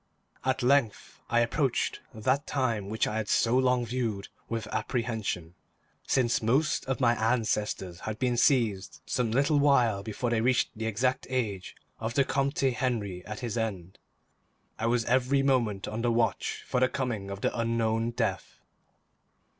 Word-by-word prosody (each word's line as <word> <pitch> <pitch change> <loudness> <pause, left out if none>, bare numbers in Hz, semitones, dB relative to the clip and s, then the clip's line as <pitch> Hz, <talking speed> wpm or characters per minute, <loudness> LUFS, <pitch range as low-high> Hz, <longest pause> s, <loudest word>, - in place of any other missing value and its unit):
At 130 -1 0
length 130 -4 +1
I 120 0 +3
approached 130 +2 0
that 130 +5 0
time 115 -8 -1
which 110 +1 0
I 105 - -2
had 110 -1 -3
so 115 +1 +3
long 125 -1 +3
viewed 115 -4 -3 0.2
with 115 -2 -2
apprehension. 110 -8 -2 0.5
Since 125 -3 +2
most 135 +8 +1
of 135 0 -2
my 120 -3 +4
ancestors 110 -6 -1
had 110 0 -5
been 125 +1 0
seized 115 -6 +2
some 125 -3 0
little 140 +6 +2
while 125 -8 +3
before 110 +3 -3
they 115 -2 +2
reached 125 +1 +2
the 110 +1 -3
exact 125 +5 0
age 110 -8 -2 0.2
of 115 +1 -3
the 140 - +5
Comte 140 +1 -1
Henri 120 -8 -1
at 105 +2 -6
his 120 -1 -2
end, 95 -5 -4 0.8
I 115 - 0
was 115 -1 +1
every 130 +2 +2
moment 120 -8 +1
on 110 +2 -3
the 120 0 +1
watch 115 -1 0
for 125 - 0
the 130 0 +3
coming 115 -7 -3
of 100 0 -6
the - - 0
unknown 115 -1 0
death. 120 - -3
115 Hz, 160 wpm, -28 LUFS, 110-130 Hz, 0.8 s, the